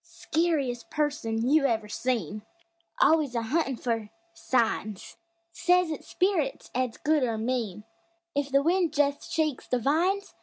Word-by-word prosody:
Skeeriest 300 -8 -1
person 285 -7 -1
you 285 0 +4
ever 220 -3 -1
seen! 220 -4 -2 0.6
Always 305 -5 +3
a 230 - 0
huntin' 275 +2 0
fer 225 -3 -2 0.2
"signs"; 225 - -1 0.4
Says 360 -1 +2
it's 310 - -6
"spirits" 360 -8 0
'at's 250 -2 -1
good, 305 0 +2
or 230 -3 0
mean, 220 -4 -2 0.5
If 285 0 -1
the 275 +1 +4
wind 345 -1 +2
jest 285 0 0
shakes 310 -5 -1
the 250 - +1
vines! 340 - +1
275 Hz, 140 wpm, -27 LUFS, 230-315 Hz, 0.6 s, you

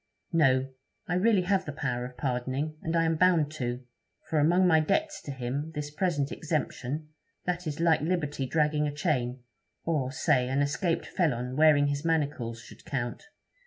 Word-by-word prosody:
'No; 135 -5 +4 0.4
I - - -1
really 195 +1 +3
have 190 +1 +1
the 145 - -4
power 125 -4 -2
of 125 0 -10
pardoning, 130 +3 -2
and 165 +1 -2
I 165 - +4
am 165 0 +1
bound 165 -4 +4
to; 125 -4 -3 0.4
for 155 - +1
among 175 +5 +4
my 160 -3 +5
debts 305 - 0
to 145 - -6
him, 135 +4 -3
this 145 0 -4
present 150 -4 0
exemption, 150 -1 -3 0.4
that 180 -1 -2
is 150 0 -4
like 165 -2 +3
liberty 150 -5 -1
dragging 150 0 +1
a - - -2
chain, 130 -5 -1 0.4
or, 145 -6 0
say, 135 -2 +2
an 135 +2 +2
escaped 165 +4 0
felon 125 -8 -1
wearing 150 -1 +5
his 145 +1 -1
manacles, 145 -8 -1
should - - -14
count. 135 - -4
150 Hz, 170 wpm, -28 LUFS, 130-165 Hz, 0.4 s, my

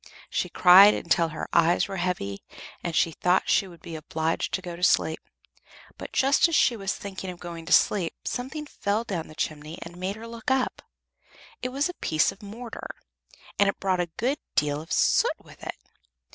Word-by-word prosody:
She - - -1
cried 190 +3 +8
until 170 0 +1
her 160 0 -6
eyes 170 +1 +4
were 195 - -5
heavy, 175 - -2 0.4
and 170 -2 -3
she 165 - +3
thought 180 +3 +1
she 195 - +3
would 170 -3 -15
be 165 - -7
obliged 160 +1 -2
to 190 - -4
go 175 -1 -6
to 175 - -12
sleep. 160 -3 +3 0.8
But - - -8
just 275 +5 +4
as 335 - -1
she 240 - +4
was 195 -2 -3
thinking 195 -1 -7
of 180 -1 -8
going 170 -2 -8
to - - -5
sleep, 180 -3 +3
something 270 +5 -4
fell 210 -6 -2
down 190 -8 -4
the 155 - -13
chimney 155 +1 -4
and 170 +1 -11
made 185 +2 -3
her 225 +1 -9
look 230 +1 -6
up. 265 -1 0 0.8
It 255 - -2
was 275 +4 0
a 360 - -6
piece 155 - +1
of 195 +3 -15
mortar, 225 +3 -8 0.6
and 200 -1 +5
it - - -3
brought 190 -2 0
a 175 -1 -1
good 260 +6 0 0.2
deal 145 0 +1
of 160 - -13
soot - - +3
with - - -17
it. - - -6
185 Hz, 200 wpm, -26 LUFS, 165-220 Hz, 0.8 s, cried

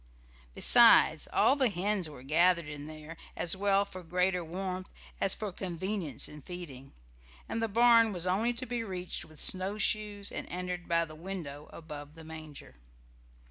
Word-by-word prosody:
Besides, - - +6
all 270 - +4
the 265 -4 +2
hens 190 -2 -1
were 140 -4 -12
gathered 170 +4 +3
in 145 0 -7
there, 155 +1 -10 0.2
as 175 +1 0
well 200 0 +2
for 185 -2 -9
greater 180 +1 0
warmth 185 +2 -5 0.3
as 195 - +3
for 210 -2 -5
convenience 185 -1 -3
in 150 0 -11
feeding, 140 -6 -9 0.5
and 225 - -3
the 225 - +1
barn 230 +1 +5
was 180 -3 -3
only 200 +6 +1
to 255 +2 -6
be 240 -1 -3
reached 185 -4 -5
with 155 -2 -15
snowshoes 205 +1 +1
and - - -6
entered 180 0 -5
by 170 -1 +2
the 155 - -12
window 155 -4 -7
above 150 -2 -10
the 165 - -11
manger. 155 -2 -10
180 Hz, 160 wpm, -30 LUFS, 160-200 Hz, 0.5 s, Besides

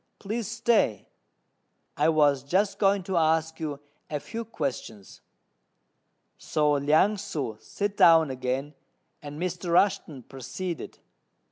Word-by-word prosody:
Please 220 +1 -4
stay: 225 - +1 0.9
I - - +3
was 145 -4 +3
just 190 +9 0
going 195 -1 +3
to 185 0 -2
ask 160 0 +1
you 150 -3 -4 0.3
a 150 - -2
few 225 +9 -6
questions." 130 - -6 1.2
So 150 -1 +1
Liang 155 +9 +3
ssŭ 150 - -5
sat 205 0 -4
down 165 -4 +6
again, 130 +3 -3 0.5
and 145 0 -8
Mr. 180 0 -3
Rushten 170 -7 +1
proceeded. 165 +7 -6
160 Hz, 115 wpm, -27 LUFS, 140-195 Hz, 1.2 s, down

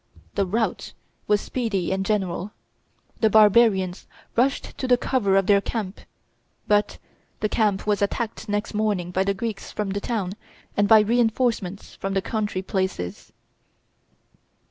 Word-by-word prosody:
The 200 -2 0
rout 220 +4 -1 0.3
was 210 -1 +3
speedy 210 -9 -2
and 190 0 0
general; 195 -1 -1 0.7
the 220 - +4
barbarians 210 -3 +4 0.3
rushed 265 +4 +1
to 260 - -2
the 250 -1 +5
cover 225 -7 +1
of 195 - +3
their 200 0 +4
camp; 205 -2 -4 0.7
but 210 0 +2 0.4
the 215 - +1
camp 210 -2 +1
was 210 -1 +1
attacked 220 +1 -2
next 205 +2 -2
morning 205 -5 0
by 185 +1 +1
the 200 0 0
Greeks 220 0 -5
from 210 -2 -3
the 200 +1 -2
town 200 -6 -2 0.4
and 205 0 +3
by 220 +1 +8
re 230 +4 +1
enforcements 225 -5 0
from 195 0 -4
the 195 - +2
country 210 -4 -2
places. 190 - -3
205 Hz, 145 wpm, -24 LUFS, 195-220 Hz, 0.7 s, by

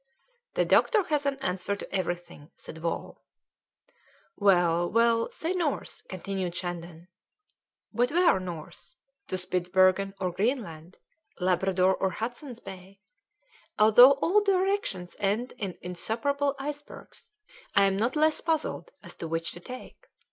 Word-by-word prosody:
"The - - +2
doctor 435 -5 +4
has 290 -2 +1
an 275 -1 0
answer 190 -3 -2
to 200 - -7
everything," 175 -5 -4
said 160 - -10
Wall. 165 +1 -4 1.1
"Well, 175 -4 +3
we'll 230 0 +3
say 330 - -4
north," 340 -6 -2
continued 185 -1 -4
Shandon. 175 -1 -6 0.9
"But 245 +1 +2
where 340 - +4
north? 175 -4 -8 0.3
To 185 - -2
Spitzbergen 185 +2 +2
or 185 -2 -1
Greenland? 185 - -3 0.4
Labrador 185 +1 +2
or 190 - 0
Hudson's 240 - -6
Bay? 190 0 -11 0.8
Although 230 +5 +8
all 355 +9 +2
directions 380 - 0
end 210 +5 -1
in 195 -5 -4
insuperable 275 +10 -1
icebergs, 290 +1 -8 0.5
I 200 - +6
am 195 -1 +3
not 230 +7 0
less 310 +1 +2
puzzled 325 +8 -1
as - - -9
to 165 - -5
which 165 +1 -2
to 175 - -7
take. 255 +8 -11
195 Hz, 125 wpm, -28 LUFS, 180-275 Hz, 1.1 s, Although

